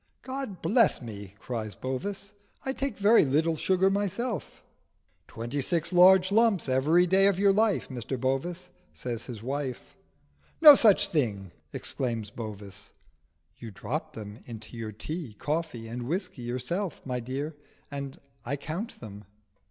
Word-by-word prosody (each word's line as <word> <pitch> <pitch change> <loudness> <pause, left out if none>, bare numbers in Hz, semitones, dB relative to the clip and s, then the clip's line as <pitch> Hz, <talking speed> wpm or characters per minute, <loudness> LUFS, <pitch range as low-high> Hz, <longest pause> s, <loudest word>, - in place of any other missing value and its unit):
"God 260 -9 -5
bless 230 -1 +4
me!" 100 -5 -9
cries 110 -3 -5
Bovis. 195 +10 -4 0.3
"I 265 - -1
take 270 -5 -3
very 210 +3 +6
little 155 +4 +2
sugar 190 +4 +2
myself." 205 +3 -2 0.6
"Twenty 120 +5 -4
six 170 +5 0
large 185 +1 +7
lumps 220 -6 +3
every 150 +7 +4
day 190 +2 +4
of 200 -2 +2
your 200 0 +4
life, 215 0 +2
Mr 130 0 -5
Bovis," 165 +8 -2 0.3
says 120 +6 -5
his 115 -4 -7
wife. 135 -1 -4 0.6
"No 305 -2 +12
such 205 -6 +5
thing!" 105 - -1 0.2
exclaims 115 -5 -3
Bovis. 105 -3 -8 0.7
"You 115 - -7
drop 100 - -4
them 105 0 -8
into 115 -1 -9
your 115 -2 -5
tea, 135 - -6
coffee, 150 -5 -3
and 120 +1 -5
whisky 180 -3 -3
yourself, 130 +10 -3
my 125 -2 -2
dear, 135 +6 -4 0.4
and 140 -1 -6 0.2
I 125 +4 -2
count 170 - -6
them." 105 -2 -10
145 Hz, 140 wpm, -28 LUFS, 120-190 Hz, 0.7 s, No